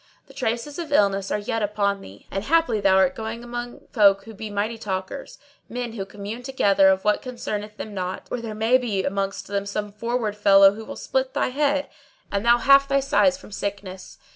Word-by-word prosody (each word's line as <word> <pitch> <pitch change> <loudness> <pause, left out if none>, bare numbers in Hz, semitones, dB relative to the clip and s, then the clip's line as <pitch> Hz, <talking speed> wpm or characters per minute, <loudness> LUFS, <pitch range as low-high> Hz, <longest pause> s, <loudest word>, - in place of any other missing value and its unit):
The - - -17
traces 240 +7 -3
of 325 -3 -5
illness 200 -6 +2
are - - 0
yet 210 +2 -2
upon 200 -1 0
thee 95 +2 -13
and 195 - -2
haply 285 -6 +2
thou 195 -1 +4
art 190 -1 +4
going 225 +2 -6
among 240 0 -6
folk 200 -3 +4
who 225 - -11
be 215 +1 -7
mighty 210 +3 -2
talkers, 210 - -5 0.3
men 245 -1 -4
who 200 -4 -4
commune 205 +4 -7
together 200 -7 +3
of 190 0 +2
what 210 0 +2
concerneth 215 -4 -5
them 215 - -7
not; 185 -1 -4
or 245 - -2
there 220 -2 -6
may 225 +4 +3
be 210 -6 -1
amongst 195 +1 -2
them 200 0 -3
some 205 0 -3
forward 225 0 -2
fellow 195 -1 +6
who 220 +1 -9
will - - -7
split - - -2
thy - - +1
head, 285 +1 0 0.4
and 200 0 -1
thou 235 +1 +5
half 275 +2 +5
thy 275 0 +2
size 275 0 +3
from 280 - -14
sickness." 195 -2 -6
215 Hz, 205 wpm, -24 LUFS, 200-245 Hz, 0.4 s, fellow